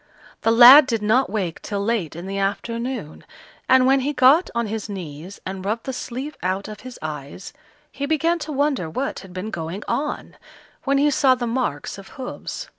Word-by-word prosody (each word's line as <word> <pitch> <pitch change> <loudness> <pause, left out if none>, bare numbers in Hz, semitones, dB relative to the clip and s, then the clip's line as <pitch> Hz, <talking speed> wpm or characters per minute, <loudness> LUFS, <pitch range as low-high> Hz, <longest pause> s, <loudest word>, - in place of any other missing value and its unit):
The - - +2
lad 250 +5 +9
did 225 -3 -1
not 245 +6 +2
wake 185 -7 -3
till 200 -1 -3
late 210 -9 -1
in 170 +2 -7
the 195 +1 -4
afternoon, 230 - -3 0.5
and 260 -1 +6
when 270 +1 +4
he 280 +3 -1
got 280 +7 +5
on 235 0 0
his 220 0 -5
knees 175 -1 -8
and 190 0 -5
rubbed 220 +4 -2
the 265 - -3
sleep 260 +4 -6
out 185 +2 -2
of 215 -1 -9
his 255 -1 -10
eyes, 150 +3 -7 0.4
he 280 - -4
began 325 +3 +1
to 305 0 -6
wonder 275 - 0
what 265 +12 -3
had 190 - -13
been 185 +4 -5
going 175 +2 -5
on, 295 +1 -3 0.5
when 275 0 +2
he 290 +1 +3
saw 265 -2 +4
the 245 -1 -3
marks 230 - -3
of 195 - -12
hoofs. 265 - -6
230 Hz, 190 wpm, -22 LUFS, 195-265 Hz, 0.5 s, lad